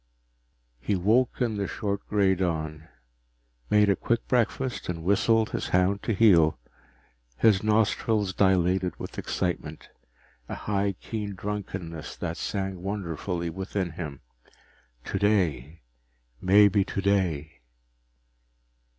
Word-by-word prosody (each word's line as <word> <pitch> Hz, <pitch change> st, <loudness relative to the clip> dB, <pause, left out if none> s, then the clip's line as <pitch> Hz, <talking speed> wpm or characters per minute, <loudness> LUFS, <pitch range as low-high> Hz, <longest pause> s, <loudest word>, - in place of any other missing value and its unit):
He 100 Hz, -, -1 dB
woke 110 Hz, +9 st, +2 dB
in 115 Hz, -4 st, 0 dB
the 100 Hz, -1 st, -1 dB
short 100 Hz, -1 st, -3 dB
gray 100 Hz, -2 st, +3 dB
dawn, 80 Hz, -4 st, -3 dB, 0.8 s
made 105 Hz, 0 st, +4 dB
a 100 Hz, -, +3 dB
quick 115 Hz, +4 st, -1 dB
breakfast, 125 Hz, -1 st, 0 dB
and 85 Hz, -2 st, -4 dB
whistled 110 Hz, +4 st, +2 dB
his -, -, -3 dB
hound 90 Hz, +2 st, +2 dB
to 115 Hz, -, -1 dB
heel. 85 Hz, -, +5 dB, 0.8 s
His 100 Hz, -, +4 dB
nostrils 105 Hz, -1 st, +1 dB
dilated 95 Hz, -2 st, +2 dB
with -, -, -7 dB
excitement, 85 Hz, -4 st, -3 dB, 0.6 s
a -, -, -4 dB
high 100 Hz, -1 st, -1 dB
keen 105 Hz, -3 st, -5 dB
drunkenness 95 Hz, -6 st, -5 dB
that -, -, -4 dB
sang 95 Hz, -2 st, -3 dB
wonderfully 90 Hz, -3 st, -3 dB
within 95 Hz, 0 st, -3 dB
him. 75 Hz, -4 st, -7 dB, 0.8 s
Today 85 Hz, -, 0 dB, 0.6 s
maybe 100 Hz, +1 st, +5 dB
today! 95 Hz, -9 st, -1 dB
95 Hz, 105 wpm, -27 LUFS, 85-105 Hz, 0.8 s, heel